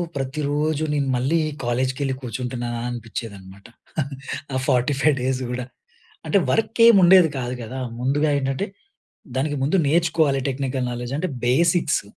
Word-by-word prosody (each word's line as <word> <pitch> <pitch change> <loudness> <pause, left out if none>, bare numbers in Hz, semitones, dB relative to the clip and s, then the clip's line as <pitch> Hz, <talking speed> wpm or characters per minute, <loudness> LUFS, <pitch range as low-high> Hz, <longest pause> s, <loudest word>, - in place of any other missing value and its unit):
ప్రతిరోజు 145 +3 -1
నేను 140 -2 0
మళ్ళీ 135 +7 +1 0.2
కాలేజ్‌కి 130 +3 -1
ఎళ్ళి 135 - 0
కూర్చుంటున్నానా? 120 0 -4
అనిపిచ్చేదనమాట. 100 -4 -7 0.9
ఆ - - +1
45 135 +4 +2
డేస్ 130 0 -1
గూడా. 125 0 -3 0.6
అంటే 200 - +3
వర్క్ 225 +1 0
ఏం 230 - +8
ఉండేది 175 -2 +7
కాదు 125 0 -3
గదా! 125 +4 -6 0.2
ముందుగా 145 +4 +1
ఏంటంటే, 135 +8 -2 0.7
దానికి 145 +2 0
ముందు 155 +8 +2
నేర్చుకోవాలి 155 -3 +2
టెక్నికల్ 130 -1 -2
నాలెడ్జ్. 120 +2 -4
అంటే 185 +1 -1 0.2
బేసిక్స్ 165 +4 +2
135 Hz, 130 wpm, -22 LUFS, 125-155 Hz, 0.9 s, ఏం